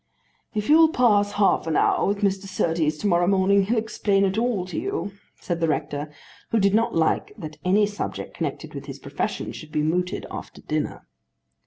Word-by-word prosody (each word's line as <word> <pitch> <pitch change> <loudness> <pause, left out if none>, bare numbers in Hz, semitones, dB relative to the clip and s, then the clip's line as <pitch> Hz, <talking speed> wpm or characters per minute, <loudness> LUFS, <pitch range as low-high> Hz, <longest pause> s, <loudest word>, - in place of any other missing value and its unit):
"If 210 0 -1
you'll 320 +1 +7
pass 210 -8 +3
half 200 -5 +2
an 160 - 0
hour - - +3
with 200 +1 -1
Mr. 195 0 0
Surtees 160 -4 0
to 205 - -2
morrow 175 -2 +3
morning, 195 +1 +4
he'll 230 +4 0
explain 205 -2 +1
it 190 0 0
all 225 -5 0
to 185 - -4
you," 395 - -3 0.3
said 175 -2 -3
the 165 - +1
rector, 150 -1 -2 0.4
who 230 - +2
did 200 -1 +3
not 225 +2 +2
like 160 -1 +1
that 155 -1 -8
any 200 +3 +4
subject 205 0 -5
connected - - -4
with - - -8
his - - -7
profession - - -4
should 155 -1 -10
be 150 - 0
mooted 180 +4 -1
after - - -8
dinner. 155 -1 -3
195 Hz, 190 wpm, -24 LUFS, 165-210 Hz, 0.4 s, you'll